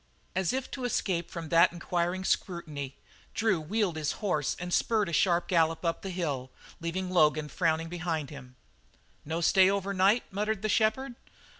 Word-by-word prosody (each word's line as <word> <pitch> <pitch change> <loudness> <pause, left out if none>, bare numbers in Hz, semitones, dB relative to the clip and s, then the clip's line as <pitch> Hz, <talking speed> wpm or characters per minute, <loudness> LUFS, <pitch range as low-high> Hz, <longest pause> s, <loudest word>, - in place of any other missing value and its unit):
As 190 -2 +1
if 260 0 -3
to 260 - -5
escape 185 -8 -1
from 165 -3 -6
that 170 +1 +5
inquiring 175 +1 -2
scrutiny, 155 -8 -2 0.4
Drew 210 -7 +2
wheeled 185 +1 -1
his 155 -1 -1
horse 165 -9 -1
and 180 0 -4
spurred 220 -3 +2
at - - -4
a - - -7
sharp 175 0 +2
gallop 165 -1 +2
up 165 - 0
the 195 - -5
hill, 145 -8 -3 0.3
leaving 180 +2 -3
Logan 155 -3 +3
frowning 165 -1 0
behind. 155 -7 -4 0.7
"No 160 +3 -2
stay 190 +2 +5
over 200 0 -1
night," 195 +5 +4
muttered 210 +1 -2
the 215 - 0
shepherd. 225 +5 +1
175 Hz, 165 wpm, -29 LUFS, 160-195 Hz, 0.7 s, that